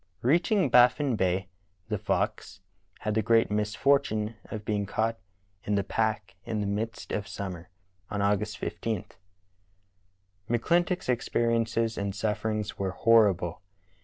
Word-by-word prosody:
Reaching 175 Hz, -, +3 dB
Baffin 125 Hz, +2 st, +5 dB
Bay, 95 Hz, -1 st, 0 dB, 0.4 s
theFox 95 Hz, -, -2 dB, 0.4 s
had 105 Hz, -, -1 dB
the 110 Hz, -, +2 dB
great 115 Hz, 0 st, +3 dB
misfortune 105 Hz, +1 st, +1 dB
of 105 Hz, -2 st, -7 dB
being 100 Hz, -1 st, -1 dB
caught 115 Hz, +2 st, -1 dB, 0.4 s
in 105 Hz, -, 0 dB
the 100 Hz, -, +1 dB
pack 110 Hz, -3 st, -1 dB
in 110 Hz, -1 st, -3 dB
the 105 Hz, -, -1 dB
midst 105 Hz, +3 st, -3 dB
of 105 Hz, -1 st, -2 dB
summer, 90 Hz, -3 st, -6 dB, 0.4 s
on 100 Hz, -, -3 dB
August 105 Hz, +1 st, 0 dB
15. 110 Hz, +2 st, -3 dB, 1.4 s
McClintock's 175 Hz, +10 st, +1 dB
experiences 115 Hz, -2 st, 0 dB
and 100 Hz, -1 st, -2 dB
sufferings 105 Hz, 0 st, -1 dB
vv^ere 95 Hz, -1 st, -3 dB
horrible. 95 Hz, -7 st, +3 dB
110 Hz, 120 wpm, -28 LUFS, 100-115 Hz, 1.4 s, Baffin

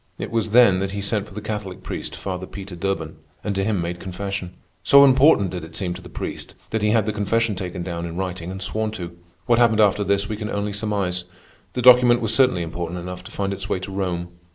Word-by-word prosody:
It -, -, -5 dB
was 115 Hz, -2 st, 0 dB
then 110 Hz, -5 st, +6 dB
that 95 Hz, 0 st, -2 dB
he 100 Hz, -, -3 dB
sent 100 Hz, +1 st, -1 dB
for 95 Hz, -, -14 dB
the 105 Hz, -, -5 dB
Catholic 105 Hz, -3 st, -5 dB
priest, -, -, -5 dB
Father 95 Hz, -1 st, -5 dB
Peter 95 Hz, -3 st, -8 dB
Durban, 95 Hz, +3 st, -3 dB, 0.3 s
and 105 Hz, -, -1 dB
to 95 Hz, 0 st, -1 dB
him 105 Hz, -1 st, 0 dB
made 85 Hz, +1 st, -3 dB
confession. 95 Hz, 0 st, -5 dB, 0.3 s
So 140 Hz, +7 st, +7 dB
important 130 Hz, -, +5 dB
did 90 Hz, -2 st, -5 dB
it 80 Hz, 0 st, -10 dB
seem 90 Hz, -3 st, -2 dB
to -, -, -9 dB
the -, -, -12 dB
priest, -, -, -6 dB, 0.2 s
that 110 Hz, -, 0 dB
he 105 Hz, -, +2 dB
had 110 Hz, -1 st, +3 dB
the 110 Hz, -, -1 dB
confession 110 Hz, +2 st, +1 dB
taken 90 Hz, -2 st, -5 dB
down 85 Hz, -1 st, -4 dB
in 85 Hz, +1 st, -7 dB
writing 90 Hz, -2 st, -4 dB
and 95 Hz, +1 st, -5 dB
sworn 110 Hz, +2 st, -1 dB
to. 85 Hz, -4 st, -7 dB, 0.3 s
What 120 Hz, 0 st, +3 dB
happened 115 Hz, -2 st, +4 dB
after 105 Hz, -1 st, +4 dB
this 100 Hz, +1 st, +1 dB
we 105 Hz, -, -4 dB
can 105 Hz, 0 st, -4 dB
only 100 Hz, 0 st, -2 dB
surmise. 100 Hz, -4 st, -2 dB, 0.5 s
The 125 Hz, -, -2 dB
document 125 Hz, -1 st, +7 dB
was 115 Hz, -1 st, 0 dB
certainly 125 Hz, -8 st, +3 dB
important 85 Hz, +1 st, -4 dB
enough 90 Hz, +1 st, -7 dB
to -, -, -10 dB
find 100 Hz, -1 st, -2 dB
its 100 Hz, +1 st, -6 dB
way -, -, 0 dB
to 95 Hz, +1 st, -6 dB
Rome. 90 Hz, -3 st, -2 dB
100 Hz, 240 wpm, -22 LUFS, 90-110 Hz, 0.5 s, So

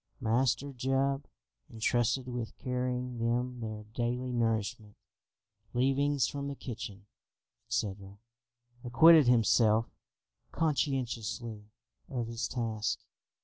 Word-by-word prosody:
Master 130 Hz, +4 st, +1 dB
Jup, 135 Hz, +2 st, 0 dB, 0.4 s
entrusted 120 Hz, +2 st, +1 dB
with 120 Hz, -2 st, -5 dB
carrying 125 Hz, -1 st, -2 dB
them 120 Hz, +2 st, -1 dB
their 110 Hz, -2 st, -5 dB
daily 125 Hz, +2 st, -1 dB
nourishment, 110 Hz, -3 st, -1 dB, 0.8 s
leavings 135 Hz, +2 st, +2 dB
from 140 Hz, 0 st, -4 dB
the 140 Hz, -, -4 dB
kitchen, 105 Hz, -6 st, -7 dB, 0.6 s
etc., 100 Hz, -3 st, -3 dB, 0.7 s
acquitted 145 Hz, +4 st, +7 dB
himself 115 Hz, -1 st, +4 dB, 0.6 s
conscientiously 125 Hz, -8 st, -1 dB, 0.4 s
of 125 Hz, -3 st, -2 dB
his 115 Hz, +1 st, -3 dB
task. 110 Hz, -3 st, -2 dB
120 Hz, 90 wpm, -31 LUFS, 115-130 Hz, 0.8 s, acquitted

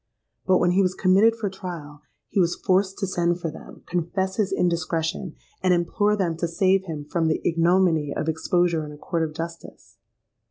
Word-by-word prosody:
But 185 Hz, -1 st, +5 dB
when 175 Hz, 0 st, +2 dB
he 190 Hz, +2 st, +3 dB
was 185 Hz, -1 st, +1 dB
committed 200 Hz, +5 st, +4 dB
for 225 Hz, -2 st, -3 dB
trial, 170 Hz, -6 st, -7 dB, 0.3 s
he -, -, -1 dB
was 175 Hz, -2 st, +2 dB
forced 190 Hz, 0 st, +1 dB
to -, -, -1 dB
send 175 Hz, -2 st, 0 dB
for 165 Hz, -3 st, -3 dB
them, -, -, -13 dB
confess 180 Hz, +2 st, -2 dB
his 210 Hz, -3 st, +1 dB
indiscretion, 170 Hz, 0 st, -1 dB, 0.3 s
and 185 Hz, -1 st, +3 dB
implore 205 Hz, +5 st, +1 dB
them 180 Hz, -5 st, -1 dB
to 170 Hz, -, -1 dB
save 190 Hz, +2 st, +2 dB
him 155 Hz, -4 st, -6 dB
from 165 Hz, +2 st, 0 dB
the 160 Hz, -, +1 dB
ignominy 165 Hz, -3 st, +2 dB
of 155 Hz, -, -3 dB
exposure 165 Hz, +1 st, +1 dB
in 150 Hz, -, -7 dB
a 150 Hz, -, -11 dB
court 165 Hz, +2 st, -2 dB
of 155 Hz, -1 st, -2 dB
justice. 165 Hz, +1 st, -8 dB
175 Hz, 190 wpm, -24 LUFS, 165-190 Hz, 0.3 s, But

